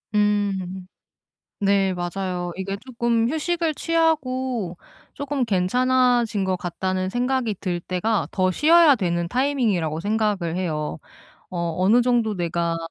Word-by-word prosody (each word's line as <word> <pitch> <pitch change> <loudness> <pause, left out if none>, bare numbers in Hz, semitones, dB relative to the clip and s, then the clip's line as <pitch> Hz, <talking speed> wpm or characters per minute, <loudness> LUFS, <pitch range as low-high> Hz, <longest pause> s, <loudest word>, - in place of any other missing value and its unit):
음. 195 -3 0 0.7
네 195 -1 +2
맞아요. 180 0 -3
이게 195 +1 -3
조금 235 -2 0
휴식을 325 +1 -1
취하고 260 - 0 0.4
조금 280 -3 -2
괜찮아진 240 +2 +2
것 185 -1 0
같다는 185 +2 -2
생각이 245 -1 0
들 175 -3 -2
때가 190 +5 -1
더 185 -1 +1
쉬어야 315 - +6
되는 170 -4 -1
타이밍이라고 220 - 0
생각을 205 -5 0
해요. 155 -4 -3 0.5
어 170 -2 -2
어느 205 +6 +4
정도 235 -3 +1
내가 170 -1 -1
205 Hz, 255 characters per minute, -23 LUFS, 180-250 Hz, 0.7 s, 쉬어야